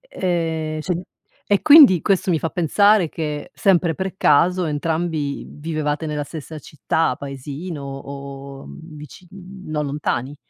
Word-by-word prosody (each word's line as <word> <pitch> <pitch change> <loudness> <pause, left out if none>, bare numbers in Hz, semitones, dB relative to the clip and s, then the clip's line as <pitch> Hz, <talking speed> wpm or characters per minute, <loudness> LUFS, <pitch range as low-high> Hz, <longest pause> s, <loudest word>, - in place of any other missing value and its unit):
e 165 - -2
cioè, 180 +1 -2 0.4
e 205 -1 +2
quindi 285 - +8
questo 195 -1 +1
mi 160 - +1
fa 165 - -2
pensare 200 +2 +3
che, 150 -2 -5
sempre 175 -4 +2
per 190 +3 -4
caso, 180 +5 +3
entrambi 155 -1 -2
vivevate 155 0 -3
nella 150 -1 -3
stessa 155 +1 -8
città, 150 0 -1
paesino 140 +3 -7
o 140 0 -8 0.2
vicin 155 +2 -12 0.4
non 150 -1 -2
lontani. 140 -1 -3
155 Hz, 125 wpm, -21 LUFS, 145-175 Hz, 0.4 s, quindi